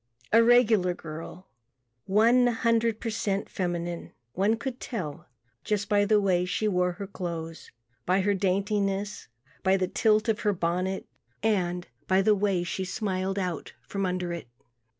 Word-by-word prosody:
A 230 +1 +7
regular 225 -7 +4
girl, 165 +3 -8 0.6
one 235 +5 +5
hundred 230 -1 +1
per 230 - -3
cent 200 -2 -1
feminine. 175 -2 -3 0.2
One 205 +5 +2
could 255 +1 -5
tell 180 - -5 0.4
just 210 -1 -1
by 205 -1 +4
the 210 0 +4
way 185 -3 +2
she 180 +4 -1
wore 180 -2 +1
her 200 +3 -6
clothes, 170 -4 -6 0.4
by 185 +2 +3
her 205 +2 +2
daintiness, 200 +1 -1 0.3
by 190 0 +3
the 185 -1 0
tilt 215 +3 +2
of 225 -1 +1
her 210 -2 +1
bonnet 180 +2 -1 0.4
and 180 -5 0 0.2
by 190 +1 +3
the 215 - +5
way 195 -3 +1
smiled 190 +1 -2
out 180 -5 -3
from 195 -1 -1
under 180 -1 -2
it. 170 - -6
195 Hz, 150 wpm, -27 LUFS, 180-215 Hz, 0.6 s, A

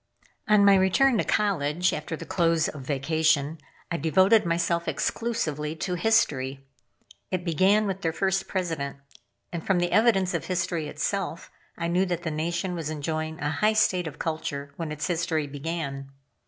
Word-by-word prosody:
On 210 -1 +5
my 200 - +7
return 205 +6 +4
to - - +2
college, 180 -4 +1
after 155 +2 -4
the - - -8
close 165 -2 +2
of 145 - -6
vacation, 150 +2 +1 0.3
I 170 - 0
devoted 190 +5 +4
myself 170 0 0
exclusively 155 -10 -2
to 180 +3 -3
history. 140 -9 +1 0.6
It 185 -1 -2
began 190 +6 +3
with 195 -1 -3
their 165 - 0
first 190 +3 0
President; 165 -7 -3 0.5
and 170 -2 -4
from 195 - +2
the 175 0 0
evidence 210 -5 +3
of - - -2
history 170 -3 -1
itself, 170 +3 -3 0.3
I 170 - -2
knew 180 +3 +1
that 175 -1 -2
the 160 - -2
Nation 170 +4 -2
was 165 -3 -4
enjoying 155 +1 -3
a 145 0 0
high 210 +8 +2
state 185 -5 +2
of 150 -2 -8
culture 145 -3 -4
when 165 -3 -4
its 150 0 -3
history 165 -3 0
began. 140 -1 -5
170 Hz, 165 wpm, -26 LUFS, 150-185 Hz, 0.6 s, my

